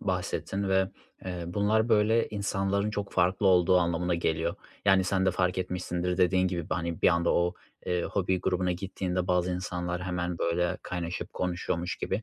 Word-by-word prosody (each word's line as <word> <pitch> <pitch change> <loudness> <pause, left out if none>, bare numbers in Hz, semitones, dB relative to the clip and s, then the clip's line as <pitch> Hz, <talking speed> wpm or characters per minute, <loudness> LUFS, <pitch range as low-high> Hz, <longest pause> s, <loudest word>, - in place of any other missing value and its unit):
bahsettin 95 +1 -2
ve, 95 0 +3 0.4
eee, 90 -2 -4
bunlar 105 +5 +1
böyle 110 +1 +3
insanların 100 0 -1
çok 105 -1 -4
farklı 95 +2 +2
olduğu 90 0 +5
anlamına 85 0 0
geliyor, 85 0 0 0.3
yani, 95 -1 +5
sen 95 0 +1
de - - +5
fark 90 0 0
etmişsindir 90 -1 -2
dediğin 95 0 +3
gibi 85 -3 -4
b - - +2
hani 85 -2 -3
bir - - +7
anda 85 0 +2
o, 90 +1 +2 0.3
eee, 90 -1 0
hobi 95 -2 0
grubuna 90 -1 0
gittiğinde 90 0 -3
bazı 90 -1 +1
insanlar 90 0 -3
hemen 90 -1 -2
böyle 90 +2 0
kaynaşıp 90 -1 -4
konuşuyormuş 90 0 -2
gibi 100 +4 -2
90 Hz, 165 wpm, -28 LUFS, 90-95 Hz, 0.4 s, bir